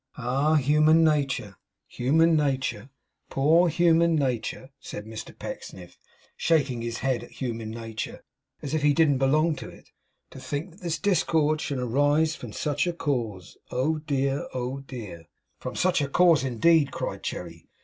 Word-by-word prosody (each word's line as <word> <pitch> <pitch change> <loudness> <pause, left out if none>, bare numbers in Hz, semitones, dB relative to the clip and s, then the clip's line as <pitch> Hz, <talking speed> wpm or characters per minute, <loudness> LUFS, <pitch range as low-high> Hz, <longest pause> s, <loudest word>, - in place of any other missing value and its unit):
'Ah, 135 +5 +1
human 155 +3 +4
nature, 140 -10 0 0.3
human 160 +6 +2
nature! 135 -5 -1 0.4
Poor 160 +6 +4
human 170 0 +3
nature!' 130 -1 -2
said 105 - -8
Mr 110 0 -9
Pecksniff, 90 -2 -9 0.4
shaking 140 -7 +1
his 115 0 -4
head 130 -3 0
at - - -12
human 115 -4 -4
nature, 115 -1 -6 0.4
as 145 - -4
if 155 - +1
he 145 -1 +3
didn't 150 -5 +3
belong 155 +4 +2
to - - -8
it. - - -17 0.4
'To - - -10
think 150 +6 -4
that 180 - -19
this 170 -2 -2
discord 160 -6 +1
should 140 - -3
arise 145 +6 +2
from 120 - -9
such 145 +7 -1
a 175 - 0
cause! 115 - -3
oh 155 +5 0
dear, 140 -2 -1
oh 130 +2 -3
dear!' 105 -12 -9 0.3
'From - - -6
such 185 -4 +2
a 140 - 0
cause 170 -2 +4
indeed!' 140 +4 +3
cried - - -4
Cherry. 85 -2 -6
140 Hz, 155 wpm, -26 LUFS, 125-160 Hz, 0.4 s, human